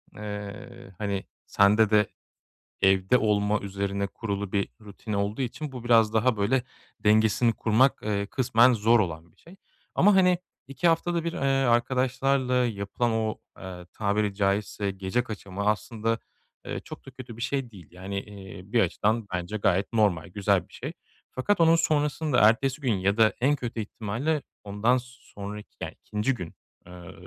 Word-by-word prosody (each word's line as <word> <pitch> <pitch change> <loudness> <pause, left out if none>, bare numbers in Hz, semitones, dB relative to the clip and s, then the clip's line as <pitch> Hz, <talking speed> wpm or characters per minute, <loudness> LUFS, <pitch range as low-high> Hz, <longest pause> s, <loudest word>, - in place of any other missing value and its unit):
eee, 105 +1 -8
hani, 100 -2 -2 0.2
sende 105 +2 +4
de 105 -2 +4 0.7
evde 95 +4 +4
olma 105 -2 +1
üzerine 100 0 -3
kurulu 100 -2 -4
bir 100 -1 0
rutin 105 +1 -8
olduğu 100 +4 -1
için 135 +4 -4
bu 125 -3 -8
biraz 115 -3 +4
daha, 110 +1 +2
böyle, 120 +5 +1 0.4
dengesini 110 +2 +3
kurmak, 120 +6 +2
eee, 100 -1 -1
kısmen 125 +2 +4
zor 115 +1 +4
olan 85 -3 -3
bir - - -35
şey. 170 +3 -16 0.4
Ama, 205 +1 +5
hani, 180 -2 +5 0.3
2 140 +6 0
haftada 170 0 +1
1, 170 0 -2
eee, - - -5 0.3
arkadaşlarla 130 +2 +1
yapılan 120 -1 0
o, 110 -1 -1 0.2
eee, 90 -2 -9
tabiri 105 -1 0
caizse 100 0 0
gece 95 +5 -1
kaçamağı 100 -4 -6
aslında, 110 +1 -1 0.5
eee, - - -4
çok - - -11
da 135 - -10
kötü 125 -3 -10
bir - - -8
şey 135 -1 -2
değil. 90 -7 -13
Yani, 95 +2 -5
eee, 100 -3 -10
bir 120 - +3
açıdan 110 +4 0
bence 90 +4 -3
gayet 100 +1 +1
normal, 100 -7 +2
güzel 100 0 0
bir - - -24
şey. - - -6 0.4
Fakat 170 +9 0
onun 165 0 +6
sonrasında 150 -3 +1
ertesi 130 +5 -1
gün 130 -5 +1
ya 100 +2 0
da 110 -1 +5
en 140 +4 +3
kötü 120 -4 -5
ihtimalle 115 +9 -2 0.2
ondan 105 +5 +1
sonraki 105 -4 -10
yani - - -4
2'inci 105 +6 0
gün, 90 -9 -7 0.3
eee, 90 0 -11
110 Hz, 160 wpm, -26 LUFS, 100-125 Hz, 0.7 s, onun